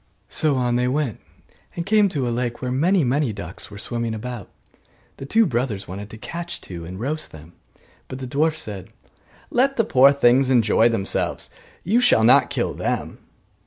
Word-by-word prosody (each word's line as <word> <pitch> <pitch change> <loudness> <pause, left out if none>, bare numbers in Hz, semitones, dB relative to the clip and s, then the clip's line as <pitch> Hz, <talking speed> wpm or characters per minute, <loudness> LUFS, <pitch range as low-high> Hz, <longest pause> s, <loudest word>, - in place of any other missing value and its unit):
So 155 -3 +1
on 125 -1 +1
they 125 0 +1
went, 135 -3 -1 0.6
and 170 - -4
came 210 0 +4
to 140 -8 -2
a 120 - -1
lake 120 0 -2
where 125 -1 -3
many 170 +7 +2
many 135 0 +1
ducks 100 -4 -8
were 100 - -10
swimming 115 +1 -3
about. 120 -1 -7 0.7
The 135 - -8
two 225 +8 +4
brothers 120 - -2
wanted 100 +3 -7
to 110 - -10
catch 170 +9 -6
two, 85 -2 -8
and 90 +3 -8
roast 150 +7 -3
them. 80 +2 -13 0.5
But 130 - -7
the 130 - -6
dwarf 150 +5 0
said, 100 - -6 0.6
'Let 270 +2 +2
the 230 - +4
poor 135 - +6
things 130 -1 +3
enjoy 115 -2 +4
themselves, 100 -4 -2 0.3
you 215 +7 +2
shall 180 - +4
not 120 - +5
kill - - -2
them. - - -3
125 Hz, 180 wpm, -22 LUFS, 110-150 Hz, 0.7 s, poor